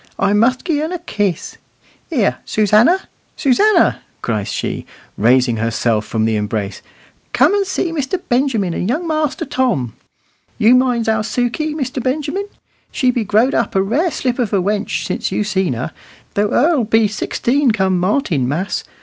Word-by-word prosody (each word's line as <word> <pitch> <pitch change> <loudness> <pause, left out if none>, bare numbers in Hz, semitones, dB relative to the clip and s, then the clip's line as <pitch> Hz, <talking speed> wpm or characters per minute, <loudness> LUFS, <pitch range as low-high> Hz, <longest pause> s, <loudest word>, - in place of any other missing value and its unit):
I 200 - +1
must 235 +7 +2
gi' 310 -4 0
un 315 +2 -2
a 360 - -2
kiss. 205 - -3 0.5
Here, 250 - +1
Susannah, 215 - +3 0.3
Susannah!" 405 - +3 0.2
cries 105 -4 -2
she, - - -4 0.3
raising 120 +1 +3
herself 115 -1 0
from 110 -1 0
the 110 -1 +1
embrace, 105 -1 -3 0.5
"come 285 +9 +4
and 400 -1 +1
see 365 -2 -1
Mr. 315 +3 -2
Benjamin 240 -8 +1
and 180 - -2
young 325 +8 -1
Master 310 -3 -1
Tom. 250 - -1 0.6
You 225 +3 +5
minds 250 -3 +2
our 220 -1 +2
Sukey, 245 +8 -2
Mr. 260 -3 -3
Benjamin; 300 - -2 0.4
she 255 -3 +2
be 240 -2 -1
growed 220 +6 +2
a 230 - +2
rare 245 - +1
slip 255 -5 -2
of 235 -5 0
a 200 - +3
wench 205 +3 -1
since - - -2
you - - 0
seen 190 -7 0
her, 120 +2 -4 0.4
though 205 +1 +1
her'll 295 -1 +3
be 225 0 +3
sixteen 250 +6 0
come 190 -4 +1
Martinmas. 180 - 0
230 Hz, 160 wpm, -17 LUFS, 190-280 Hz, 0.6 s, You